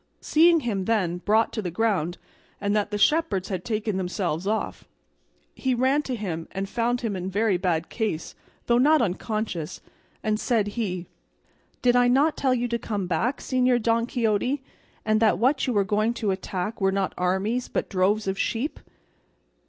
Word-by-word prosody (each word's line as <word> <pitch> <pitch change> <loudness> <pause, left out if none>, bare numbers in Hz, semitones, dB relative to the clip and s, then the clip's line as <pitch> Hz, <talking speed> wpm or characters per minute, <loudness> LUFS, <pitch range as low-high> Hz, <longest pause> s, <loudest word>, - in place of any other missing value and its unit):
Seeing 330 +1 +4
him, 200 -7 -2
then, 185 -6 0
brought 220 +4 +2
to 220 - -2
the 180 - -3
ground, 180 -3 0 0.4
and 200 +1 0
that 210 -1 +1
the 210 - -2
shepherds 250 - +2
had 185 -3 -3
taken 215 -3 -2
themselves 180 -2 -2
off, 220 +1 -2 0.7
he 260 -1 0
ran 260 +4 +2
to 260 -4 -4
him 175 -7 -4
and 195 +1 -3
found 240 +3 0
him 225 -4 -2
in 185 0 -3
very 205 +1 +1
bad 175 -2 0
case, 215 -8 -3 0.3
though 240 0 +3
not 305 +4 +5
unconscious; 195 - -2 0.4
and 215 0 0
said 220 -4 +1
he: 190 -5 -3 0.8
"Did 245 -1 +4
I 245 0 +5
not 280 +6 +3
tell 260 -2 +1
you 245 0 -1
to 235 0 -1
come 205 -5 -3
back, 200 - 0
Señor 255 -1 +2
Don 230 +1 +2
Quixote; 245 +4 0 0.4
and 215 0 +3
that 220 -1 +3
what 265 +5 +2
you 250 - +1
were 205 -2 +3
going 215 +3 0
to 215 -4 0
attack 190 +2 -4
were 195 0 +3
not 195 -1 -1
armies 190 +7 0
but - - -2
droves 200 +2 +1
of 190 0 -2
sheep?" 245 +7 -1
215 Hz, 175 wpm, -25 LUFS, 190-240 Hz, 0.8 s, not